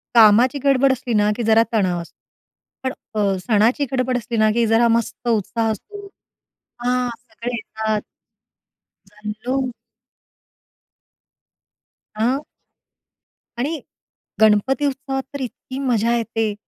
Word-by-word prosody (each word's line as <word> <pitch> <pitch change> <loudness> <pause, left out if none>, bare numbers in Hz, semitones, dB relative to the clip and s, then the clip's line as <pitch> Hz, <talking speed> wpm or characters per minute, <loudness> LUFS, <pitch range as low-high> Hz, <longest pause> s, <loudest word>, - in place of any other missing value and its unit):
कामाची 235 +5 +6
गडबड 275 -1 +4
असली 250 -2 -2
ना, 210 -1 +3
की 240 - -3
जरा 225 +1 +6
तणाव 185 -5 +1
असतो. 170 - -13 0.7
पण 260 - 0 0.2
अ, 200 -2 +1
सणाची 225 +8 +2
गडबड 255 -1 +1
असली 230 0 -4
ना 215 0 +4
की 235 +1 +2
जरा 225 +2 +4
मस्त 235 +1 -5
उत्साह 225 0 +1
असतो 405 - -8 0.7
हां, 250 0 0
सगळे 240 0 -6
येतात. 220 -2 -2 1.1
जनलो. 215 +6 -3 2.5
अ 235 +5 +1 1.2
आणि 295 +6 -2 0.6
गणपती 220 +7 +4
उत्सवात 270 -1 -2
तर 280 - -4
इतकी 260 +1 -6
मजा 235 -3 +1
येते. 225 -2 -1
235 Hz, 110 wpm, -21 LUFS, 215-260 Hz, 2.5 s, कामाची